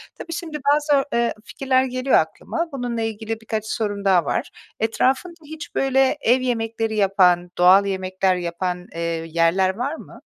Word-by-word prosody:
Tabii, 335 - -7
şimdi 320 -2 -5 0.2
bazı, 295 -2 +2
eee, 235 0 +1
fikirler 260 0 +1
geliyor 255 +1 0
aklıma. 335 0 -2
Bununla 245 -3 -3
ilgili 225 0 -4
birkaç 220 -1 -3
sorum 205 -2 -3
daha 180 -4 +4
var. - - -2 0.3
Etrafında 265 +9 0
hiç, 310 +1 -9
böyle, 270 +1 +2
ev 250 +3 +3
yemekleri 225 -2 -2
yapan, 185 -3 +3
doğal 185 +3 +6
yemekler 190 -1 0
yapan, 180 +1 -3
eee, 170 - -5 0.3
yerler 170 +3 +2
var 265 +8 -3
mı? - - -13
225 Hz, 150 wpm, -22 LUFS, 190-260 Hz, 0.3 s, doğal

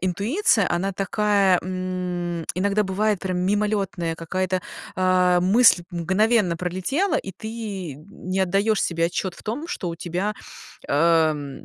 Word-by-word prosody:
интуиция, 200 - +1
она 190 +3 0
такая, 195 -1 +2
м, 180 -2 -3
иногда 200 +3 +1
бывает 205 +1 0
прям 185 -1 -2
мимолётная, 195 -3 0
какая-то, 185 +3 -2 0.4
а, 180 -1 +3
мысль 190 -1 +5
мгновенно 190 +2 +1
пролетела, 185 - -1
и 190 - -4
ты 205 -6 -6
не 185 +5 -5
отдаёшь 195 +3 +2
себе 165 -1 0
отчёт 180 +1 -3
в - - -15
том, 240 +9 -4
что 180 - -4
у 165 - -5
тебя, 180 +5 -2 0.5
эм, 155 -2 +1
185 Hz, 130 wpm, -23 LUFS, 175-205 Hz, 0.5 s, мысль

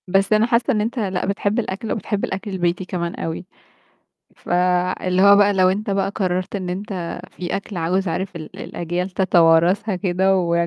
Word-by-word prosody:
بس 195 +3 +2
أنا 215 +1 +4
حاسّة 235 +3 +2
إن 215 - +1
أنت 235 +4 -2
لأ 190 -4 -1
بتحب 200 +3 0
الأكل 215 0 -4
وبتحب 205 -1 -2
الأكل 195 +2 -5
البيتي 180 0 -1
كمان 170 -2 -3
أوي، 165 +2 -5 0.9
فاللي 180 +1 +1
هو 200 0 +8
بقى 205 0 +5
لو 185 -2 +4
أنت 200 +3 -1
بقى 195 -1 +1
قرَّرت 185 0 -1
إن 185 -2 -4
أنت 185 -3 -5
في 180 -1 -4
أكل 200 0 -7
عاوز 180 +3 0
عارف 185 +2 -3
ال 155 -2 -9
الأجيال 175 +2 -3
تتوارثها 180 +2 +3
كده 190 +1 +1
ويا 170 -1 +1
185 Hz, 175 wpm, -21 LUFS, 180-200 Hz, 0.9 s, هو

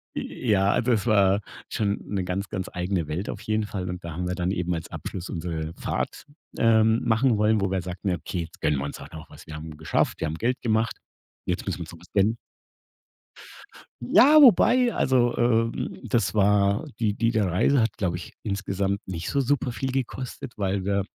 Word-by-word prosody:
ja, 100 -5 0
also 125 +1 +1
es 110 +2 0
war 100 -2 +4 0.3
schon 100 -1 0
'ne 100 -2 -2
ganz, 95 +2 -3
ganz 95 -2 -4
eigene 90 -2 -1
Welt 85 +7 -3
auf - - -8
jeden 110 0 -1
Fall 95 -3 -4
und 90 0 -6
da 85 - -6
haben 90 +3 -3
wir 90 - -2
dann 90 +1 -1
eben 90 -2 -1
als 80 - -6
Abschluss 90 -1 -6
unsere 80 -2 -4
Fahrt, - - -3 0.3
ähm, 110 0 +4
machen 115 0 +3
wollen, 105 0 +3
wo 100 -1 0
wir 95 -2 0
sagten: 90 +2 -3
„Okay, 90 0 -3
jetzt 80 - -10
gönnen 75 -2 +2
wir 70 - -3
uns 70 - -6
halt - - -11
noch 80 -1 -10
was. - - -14
Wir 80 - -7
haben 80 0 -8
geschafft, 80 - 0
wir 80 - 0
haben 75 - -3
Geld 125 +3 -1
gemacht. 110 -1 0 0.5
Jetzt - - -2
müssen - - -3
wir - - -6
uns - - -10
noch - - -12
was - - -18
gönnen.“ 105 +4 +2 1.6
Ja, 295 - +6
wobei 245 0 +6
Also, 125 -2 +2
ähm, 115 -1 0
das 115 +1 +1
war 100 +4 +3
die 110 -3 +1
diese 115 -1 +1
Reise 120 +9 +3
hat 110 -1 -1
glaube 90 -3 -1
ich 90 - -8
insgesamt 100 0 -2
nicht 90 -3 -5
so 140 - +1
super 130 -1 0
viel 135 0 -3
gekostet, 130 -1 -4
weil 95 -1 -1
wir 100 0 +1
100 Hz, 200 wpm, -25 LUFS, 90-115 Hz, 1.6 s, Ja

